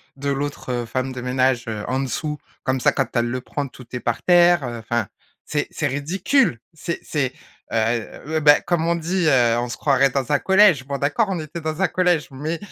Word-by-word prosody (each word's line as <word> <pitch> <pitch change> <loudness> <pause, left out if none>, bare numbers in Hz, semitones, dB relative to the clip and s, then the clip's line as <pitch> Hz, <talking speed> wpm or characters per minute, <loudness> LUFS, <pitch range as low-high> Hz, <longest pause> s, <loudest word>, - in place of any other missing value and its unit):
de 140 +1 -3
l'autre, 140 -1 -3
heu, 120 -1 -2
femme 130 +3 -3
de 130 - -6
ménage, 125 0 +1
heu, 110 -2 -4
en 130 - 0
dessous, 150 +3 -3 0.3
comme 130 0 0
ça - - +3
quand 135 - -1
elle 120 - +2
le 130 +1 -3
prend, 140 +2 -4
tout 125 -1 -14
est 125 - -2
par 120 -1 -2
terre, 175 -2 +5
heu, 120 -1 -5
enfin 115 -1 -2 0.4
c'est - - -1
c'est - - -1
ridicule, 165 - +1
c'est 170 +2 -4
c'est, 135 -4 -1 0.4
heu, 115 0 -1
ouais, - - +3
bah, 145 -1 +6
comme 170 -2 0
on 170 - +2
dit, 170 +2 -1
heu: 120 -5 +4
«On 120 - -2
se 120 - -5
croirait 140 -1 +3
dans 135 -1 -2
un 145 - +3
collège». 190 -8 +4
Bon 140 0 -2
d'accord 150 +11 +1
on 180 -4 -2
était 155 +2 -7
dans 155 +2 -4
un 190 - +3
collège, 180 -4 +1
mais 150 +5 -3
140 Hz, 220 wpm, -22 LUFS, 125-165 Hz, 0.4 s, bah